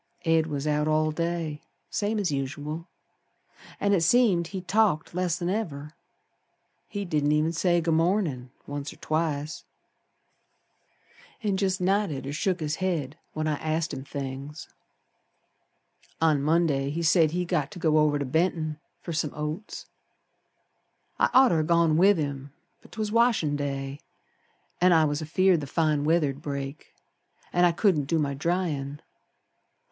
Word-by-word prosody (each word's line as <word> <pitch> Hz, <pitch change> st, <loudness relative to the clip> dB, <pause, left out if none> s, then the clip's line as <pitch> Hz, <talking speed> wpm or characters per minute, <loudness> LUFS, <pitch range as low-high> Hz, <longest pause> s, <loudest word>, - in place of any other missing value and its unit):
Ed 165 Hz, -1 st, +3 dB
was 145 Hz, -2 st, -3 dB
out 150 Hz, 0 st, +1 dB
all 155 Hz, 0 st, +2 dB
day 165 Hz, -2 st, -3 dB, 0.3 s
Same 210 Hz, +1 st, -1 dB
as 195 Hz, -6 st, 0 dB
usual. 145 Hz, +4 st, -4 dB, 0.9 s
An' 200 Hz, 0 st, +2 dB
it 185 Hz, -, +3 dB
seemed 180 Hz, -2 st, +3 dB
he 190 Hz, +1 st, -5 dB
talked 185 Hz, -5 st, +1 dB
less'n 175 Hz, -1 st, -1 dB
ever. 155 Hz, -7 st, -3 dB, 0.9 s
He 200 Hz, -1 st, -4 dB
didn't 150 Hz, -3 st, +1 dB
even 155 Hz, +2 st, +2 dB
say 175 Hz, +1 st, +2 dB
'Good 165 Hz, 0 st, +1 dB
mornin'', 165 Hz, -7 st, +1 dB, 0.2 s
once 145 Hz, 0 st, -5 dB
or -, -, -13 dB
twice, 155 Hz, -1 st, -2 dB, 1.8 s
An' 205 Hz, -2 st, +1 dB
jest 190 Hz, -1 st, 0 dB
nodded 180 Hz, -7 st, 0 dB
or 140 Hz, -, -4 dB
shook 180 Hz, +3 st, -1 dB
his 150 Hz, 0 st, -2 dB
head 165 Hz, -7 st, -2 dB, 0.2 s
when 155 Hz, 0 st, -2 dB
I 150 Hz, -1 st, 0 dB
asked 155 Hz, +1 st, -2 dB
him 130 Hz, -, -5 dB
things. 140 Hz, +2 st, -6 dB, 1.5 s
On 155 Hz, -3 st, +3 dB
Monday 150 Hz, -3 st, +2 dB
he 165 Hz, +4 st, -3 dB
said 165 Hz, -1 st, +4 dB
he'd 180 Hz, +2 st, -2 dB
got 145 Hz, -2 st, 0 dB
to -, -, -11 dB
go 155 Hz, -2 st, +3 dB
over 150 Hz, -1 st, +3 dB
to 140 Hz, -, -2 dB
Benton 160 Hz, +1 st, 0 dB, 0.2 s
Fer 170 Hz, -, -6 dB
some 155 Hz, -2 st, -1 dB
oats. 150 Hz, +7 st, -5 dB, 1.3 s
I'd -, -, +4 dB
oughter 250 Hz, -11 st, +5 dB
ha' 155 Hz, -, -3 dB
gone 170 Hz, -2 st, +3 dB
with 190 Hz, +4 st, +5 dB
him, 140 Hz, -2 st, -4 dB, 0.3 s
But -, -, -19 dB
'twas 215 Hz, -2 st, -3 dB
washin' 230 Hz, -10 st, +3 dB
day 140 Hz, -1 st, -4 dB, 0.8 s
An' 180 Hz, 0 st, +6 dB
I 160 Hz, -1 st, +5 dB
was 145 Hz, +1 st, -1 dB
afeared 175 Hz, +2 st, +2 dB
the 140 Hz, -, -6 dB
fine 155 Hz, -1 st, +1 dB
weather'd 150 Hz, -4 st, +1 dB
break, 140 Hz, -1 st, -6 dB, 0.6 s
An' 175 Hz, 0 st, +4 dB
I 175 Hz, -, +5 dB
couldn't 170 Hz, -5 st, +2 dB
do 165 Hz, +4 st, 0 dB
my 145 Hz, -3 st, 0 dB
dryin'. 145 Hz, -2 st, -2 dB
155 Hz, 150 wpm, -27 LUFS, 145-175 Hz, 1.8 s, An